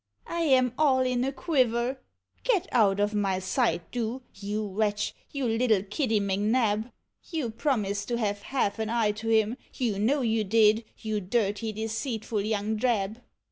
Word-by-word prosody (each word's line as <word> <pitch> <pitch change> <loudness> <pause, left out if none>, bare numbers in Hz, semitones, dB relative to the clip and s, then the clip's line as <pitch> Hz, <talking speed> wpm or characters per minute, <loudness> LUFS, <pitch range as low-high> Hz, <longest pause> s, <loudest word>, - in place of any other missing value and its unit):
I 340 - -4
am 260 -6 +3
all 270 -4 +4
in 250 -1 +1
a 270 - 0
quiver 255 -3 +1 0.2
— - - -41
get 400 -7 +2
out 205 -4 +3
of 205 +1 +1
my 200 -2 +1
sight, 190 0 0
do, 245 +2 -3
you 210 +2 -3
wretch, 205 +1 -1 0.2
vou 280 -1 -3
little 225 -3 +2
Kittv 220 +2 0
M'Xab! 210 +3 +1 0.4
You 310 -9 -2
promised 210 -6 -1
to 240 - -1
have 205 -3 -1
half 225 -4 -1
an 220 -1 -1
eye 225 -2 +2
to 220 +2 -5
him, 220 +2 +3 0.2
you 225 -6 -1
know 265 +7 +2
you 225 -2 +1
did, 220 +2 +4
you 215 -1 -2
dirty 205 +2 0
deceitful 220 0 -3
young 215 +1 -1
drab. 220 -1 0
220 Hz, 165 wpm, -27 LUFS, 205-250 Hz, 0.4 s, all